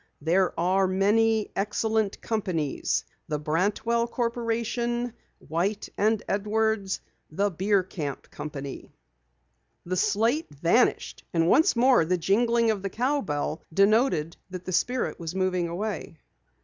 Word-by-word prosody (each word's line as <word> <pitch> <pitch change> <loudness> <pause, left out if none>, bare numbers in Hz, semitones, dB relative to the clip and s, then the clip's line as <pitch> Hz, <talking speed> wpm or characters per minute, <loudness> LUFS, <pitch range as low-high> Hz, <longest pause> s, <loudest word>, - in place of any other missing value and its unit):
There 175 +3 +1
are 190 +2 +3
many 215 +3 +2
excellent 210 +1 0
companies 180 -10 -1 0.2
the 150 - -1
Brantwell 205 +10 0
Corporation, 235 0 -1 0.2
White 180 +7 -2
and 215 +1 +1
Edwards, 210 -1 0 0.3
the 200 +6 0
Bierkamp 185 -6 -1
Company." 145 -2 -7 1.0
The 185 +1 -2
slate 220 - +1
vanished 170 - +1
and 165 0 +3
once 305 - +4
more 245 -4 +5
the 180 +3 +1
jingling 230 +5 +2
of 205 -3 -3
the 195 - -3
cowbell 190 - -1
denoted 195 - +2
that 185 -1 -7
the 185 - -4
spirit 250 +7 0
was 165 +1 -5
moving 185 -2 0
away. 185 -1 -4
200 Hz, 115 wpm, -26 LUFS, 175-225 Hz, 1.0 s, more